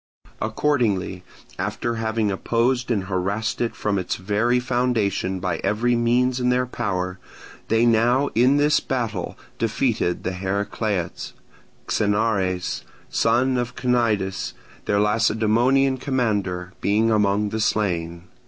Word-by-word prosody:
Accordingly, 110 Hz, -6 st, 0 dB, 0.4 s
after 120 Hz, -1 st, -2 dB
having 110 Hz, -2 st, 0 dB
opposed 120 Hz, +5 st, 0 dB
and 105 Hz, -5 st, +1 dB
harassed 100 Hz, +5 st, -2 dB
it 120 Hz, -, -1 dB
from 100 Hz, -2 st, -1 dB
its 90 Hz, -, -2 dB
very 105 Hz, +6 st, +1 dB
foundation 120 Hz, -7 st, 0 dB
by 90 Hz, +1 st, -1 dB
every 110 Hz, +5 st, +1 dB
means 120 Hz, +2 st, +2 dB
in 125 Hz, 0 st, +1 dB
their 125 Hz, 0 st, +2 dB
power, 95 Hz, -7 st, -3 dB, 0.5 s
they 115 Hz, +1 st, +3 dB
now 120 Hz, +4 st, +3 dB
in 125 Hz, +5 st, +4 dB
this 145 Hz, +1 st, +4 dB
battle 115 Hz, -8 st, -3 dB, 0.2 s
defeated 115 Hz, -5 st, 0 dB
the 95 Hz, -, -1 dB
Heracleots, 100 Hz, 0 st, -2 dB, 0.5 s
Xenares, 100 Hz, -4 st, 0 dB, 0.3 s
son 125 Hz, +3 st, +2 dB
of 120 Hz, 0 st, -3 dB
Cnidis, 110 Hz, -6 st, 0 dB, 0.3 s
their 100 Hz, -, +1 dB
Lacedaemonian 115 Hz, +5 st, +2 dB
commander, 105 Hz, -9 st, -1 dB
being 110 Hz, +3 st, +2 dB
among 105 Hz, -1 st, +2 dB
the 110 Hz, -, -3 dB
slain. 85 Hz, -6 st, -1 dB
110 Hz, 115 wpm, -23 LUFS, 100-120 Hz, 0.5 s, in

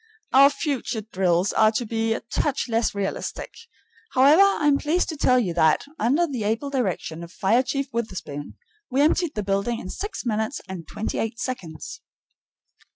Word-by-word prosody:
Our 275 Hz, +2 st, +8 dB
future 280 Hz, -6 st, -3 dB
drills 190 Hz, -3 st, 0 dB
are 215 Hz, 0 st, +5 dB
to 240 Hz, +2 st, -1 dB
be 225 Hz, 0 st, 0 dB
a -, -, -5 dB
touch 270 Hz, +5 st, -1 dB
less 225 Hz, -2 st, 0 dB
realistic. 200 Hz, -1 st, -4 dB, 0.6 s
However, 280 Hz, +7 st, +6 dB
I 395 Hz, -6 st, +3 dB
am 285 Hz, -1 st, +4 dB
pleased 330 Hz, +5 st, 0 dB
to 320 Hz, -, -3 dB
tell 255 Hz, -3 st, +3 dB
you 200 Hz, -9 st, 0 dB
that, 160 Hz, -2 st, +3 dB, 0.2 s
under 280 Hz, +10 st, +3 dB
the 260 Hz, -9 st, -4 dB
able 225 Hz, +7 st, -1 dB
direction 185 Hz, -, -2 dB
of 170 Hz, -, -10 dB
Fire 215 Hz, +7 st, +2 dB
Chief 275 Hz, +1 st, -2 dB
Witherspoon, 185 Hz, -11 st, -5 dB, 0.3 s
we 265 Hz, +1 st, 0 dB
emptied 315 Hz, 0 st, +2 dB
the 210 Hz, -, -2 dB
building 200 Hz, +4 st, -1 dB
in 185 Hz, -, -7 dB
six 410 Hz, -9 st, -5 dB
minutes 220 Hz, +3 st, -1 dB
and 180 Hz, -4 st, -7 dB
twenty 220 Hz, -, -4 dB
eight 225 Hz, +1 st, -2 dB
seconds. 250 Hz, -, -6 dB
230 Hz, 170 wpm, -24 LUFS, 195-280 Hz, 0.6 s, Our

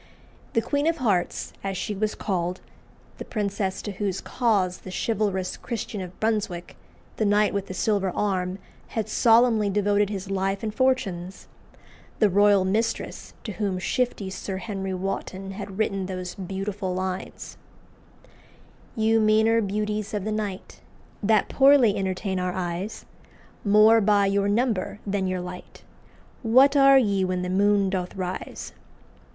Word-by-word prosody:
The 230 Hz, -, +2 dB
"Queen 285 Hz, +5 st, 0 dB
of 330 Hz, 0 st, +1 dB
Hearts," 205 Hz, -, -1 dB
as 195 Hz, -1 st, -3 dB
she 210 Hz, -, -3 dB
was 210 Hz, +1 st, -1 dB
called 180 Hz, -2 st, -2 dB, 0.6 s
the -, -, -4 dB
princess 200 Hz, -3 st, -2 dB
to 205 Hz, -, -4 dB
whose 195 Hz, -1 st, -2 dB
cause 200 Hz, -7 st, 0 dB
the -, -, -10 dB
chivalrous 195 Hz, -2 st, -1 dB
Christian 220 Hz, -3 st, -5 dB
of 180 Hz, 0 st, -9 dB
Brunswick, 210 Hz, -6 st, -2 dB, 0.4 s
the -, -, +1 dB
knight 210 Hz, 0 st, +3 dB
with 200 Hz, -1 st, -2 dB
the 185 Hz, -, -6 dB
silver 200 Hz, -2 st, +1 dB
arm, 185 Hz, -2 st, -1 dB, 0.3 s
had 220 Hz, -3 st, -3 dB
solemnly 225 Hz, -2 st, +4 dB
devoted 205 Hz, 0 st, +2 dB
his 195 Hz, -1 st, -5 dB
life 195 Hz, +1 st, -1 dB
and 215 Hz, -1 st, -2 dB
fortunes 195 Hz, -8 st, -1 dB, 0.7 s
the 210 Hz, -3 st, +3 dB
"royal 200 Hz, 0 st, +4 dB
mistress" 225 Hz, +4 st, -2 dB
to 220 Hz, -, -5 dB
whom 195 Hz, -1 st, -2 dB
shifty 200 Hz, -1 st, -1 dB
Sir 190 Hz, 0 st, -5 dB
Henry 195 Hz, -2 st, -4 dB
Wotton 195 Hz, 0 st, -4 dB
had 195 Hz, -1 st, -7 dB
written 195 Hz, -3 st, -1 dB
those 185 Hz, -1 st, -5 dB
beautiful 195 Hz, 0 st, -4 dB
lines 185 Hz, 0 st, -5 dB, 1.4 s
"You 225 Hz, 0 st, +3 dB
meaner 220 Hz, +1 st, +4 dB
beauties 210 Hz, +1 st, -2 dB
of 205 Hz, -, -2 dB
the 215 Hz, -, -2 dB
night, 210 Hz, -3 st, -5 dB, 0.4 s
That 215 Hz, -1 st, +3 dB
poorly 270 Hz, -6 st, +5 dB
entertain 190 Hz, 0 st, -2 dB
our 180 Hz, 0 st, -1 dB
eyes 180 Hz, +3 st, -4 dB, 0.6 s
More 215 Hz, +2 st, +6 dB
by 205 Hz, -1 st, +4 dB
your 200 Hz, 0 st, +1 dB
number 215 Hz, -2 st, 0 dB
than 195 Hz, -1 st, -1 dB
your 185 Hz, -1 st, -2 dB
light, 180 Hz, 0 st, -9 dB, 0.6 s
What 260 Hz, +5 st, +5 dB
are 275 Hz, -1 st, +7 dB
ye 200 Hz, -6 st, +2 dB
when 185 Hz, -1 st, -1 dB
the 180 Hz, -, -3 dB
moon 200 Hz, 0 st, +3 dB
doth 180 Hz, -2 st, -3 dB
rise?" 185 Hz, -1 st, -5 dB
200 Hz, 145 wpm, -25 LUFS, 190-215 Hz, 1.4 s, are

